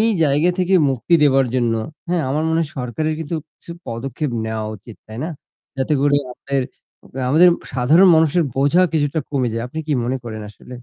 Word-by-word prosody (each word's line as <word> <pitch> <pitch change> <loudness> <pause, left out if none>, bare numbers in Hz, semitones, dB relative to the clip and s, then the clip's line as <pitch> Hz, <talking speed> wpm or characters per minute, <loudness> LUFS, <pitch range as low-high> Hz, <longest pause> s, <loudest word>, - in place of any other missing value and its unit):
এই 225 - +3 0.2
জায়গা 150 +5 +2
থেকে 185 +1 +2 0.2
মুক্তি 135 +7 0
দেবার 135 -2 +4
জন্য, 120 -2 +1 0.3
হ্যাঁ 175 -2 0
আমার 150 +3 0
মনে 160 0 +1
হয় 155 - -6
সরকারের 155 +6 -2
কিন্তু 160 +1 -3 0.2
কিছু - - -14 0.2
পদক্ষেপ 130 +5 -4 0.2
নেওয়া 110 -1 -3
উচিত 110 +3 -14
তাই 110 +2 -8
না? 170 - -4 0.5
যাতে 135 +3 +1
করে 145 0 +3
আমাদের 135 +1 -2 0.7
আমাদের 165 +6 +6 0.3
সাধারণ 155 +10 +5
মানুষের 160 +2 +3
বোঝা 145 +7 +3
কিছুটা 150 0 0
কমে 130 -4 0
যায়। 115 +1 -3
আপনি 160 - -7
কি 150 - +1
মনে 130 +2 -1
করেন 110 -2 -6
আসলে? 105 - -20
145 Hz, 185 wpm, -20 LUFS, 125-160 Hz, 0.7 s, আমাদের